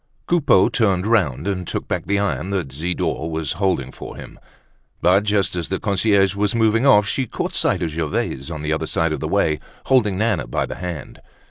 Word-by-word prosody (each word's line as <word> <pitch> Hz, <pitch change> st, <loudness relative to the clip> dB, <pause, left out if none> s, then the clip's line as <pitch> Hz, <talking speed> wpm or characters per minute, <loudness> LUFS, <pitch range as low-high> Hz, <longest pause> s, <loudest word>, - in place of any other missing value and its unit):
Coupeau 150 Hz, -, +4 dB
turned 95 Hz, -5 st, +1 dB
round, 90 Hz, -, +1 dB
and 90 Hz, -3 st, -2 dB
took -, -, -4 dB
back -, -, -3 dB
the 100 Hz, +1 st, +1 dB
iron 100 Hz, -2 st, -1 dB
that 95 Hz, -9 st, -2 dB
Zidore 80 Hz, +1 st, -2 dB
was 80 Hz, -3 st, -2 dB
holding 90 Hz, -10 st, -1 dB
for -, -, -9 dB
him. -, -, -11 dB, 0.6 s
But 95 Hz, +4 st, +3 dB
just 100 Hz, -3 st, +1 dB
as 85 Hz, -2 st, -3 dB
the 95 Hz, -, -1 dB
concierge 100 Hz, -1 st, +2 dB
was 100 Hz, +2 st, 0 dB
moving 115 Hz, +3 st, +3 dB
off, 105 Hz, -6 st, +6 dB
she 130 Hz, +2 st, -1 dB
caught -, -, -4 dB
sight -, -, +1 dB
of 80 Hz, -, -2 dB
Gervaise 75 Hz, -3 st, -2 dB
on 80 Hz, -3 st, -6 dB
the 75 Hz, +1 st, 0 dB
other 80 Hz, 0 st, -2 dB
side 80 Hz, 0 st, 0 dB
of 75 Hz, -, -3 dB
the -, -, -3 dB
way, 75 Hz, -1 st, +1 dB, 0.3 s
holding 110 Hz, -8 st, +3 dB
Nana 110 Hz, -, 0 dB
by -, -, -1 dB
the -, -, -7 dB
hand. 90 Hz, -5 st, -6 dB
95 Hz, 205 wpm, -21 LUFS, 80-105 Hz, 0.6 s, off